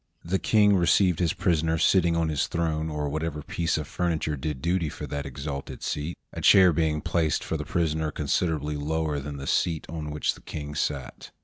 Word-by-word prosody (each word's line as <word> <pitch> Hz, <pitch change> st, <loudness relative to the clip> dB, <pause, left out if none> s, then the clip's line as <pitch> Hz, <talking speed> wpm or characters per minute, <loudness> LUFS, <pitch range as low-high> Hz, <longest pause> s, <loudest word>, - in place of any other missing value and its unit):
The 95 Hz, +3 st, 0 dB
King 105 Hz, -2 st, +4 dB
received 90 Hz, 0 st, +3 dB
his 85 Hz, -3 st, +2 dB
prisoner 80 Hz, -4 st, +1 dB
sitting 85 Hz, 0 st, +3 dB
on 85 Hz, -1 st, +1 dB
his 75 Hz, -2 st, 0 dB
throne, 80 Hz, -1 st, -1 dB
or 75 Hz, -1 st, -2 dB
whatever 75 Hz, 0 st, -3 dB
piece 85 Hz, +1 st, -1 dB
of 75 Hz, -, -4 dB
furniture 80 Hz, -3 st, -1 dB
did 70 Hz, 0 st, -4 dB
duty 85 Hz, +1 st, 0 dB
for -, -, -7 dB
that 70 Hz, -1 st, -4 dB
exalted 70 Hz, +1 st, -6 dB
seat, 75 Hz, +3 st, -3 dB, 0.2 s
a -, -, -5 dB
chair 95 Hz, -3 st, +7 dB
being 75 Hz, -1 st, +1 dB
placed 80 Hz, -4 st, 0 dB
for -, -, -3 dB
the -, -, -4 dB
prisoner 80 Hz, -2 st, 0 dB
considerably 75 Hz, 0 st, -1 dB
lower 75 Hz, 0 st, -1 dB
than 70 Hz, +1 st, -6 dB
the 70 Hz, -, -6 dB
seat 80 Hz, +2 st, 0 dB
on 80 Hz, -2 st, -5 dB
which 75 Hz, 0 st, 0 dB
the -, -, -15 dB
King 75 Hz, -1 st, -6 dB
sat. 70 Hz, -4 st, -3 dB
80 Hz, 195 wpm, -26 LUFS, 75-85 Hz, 0.2 s, chair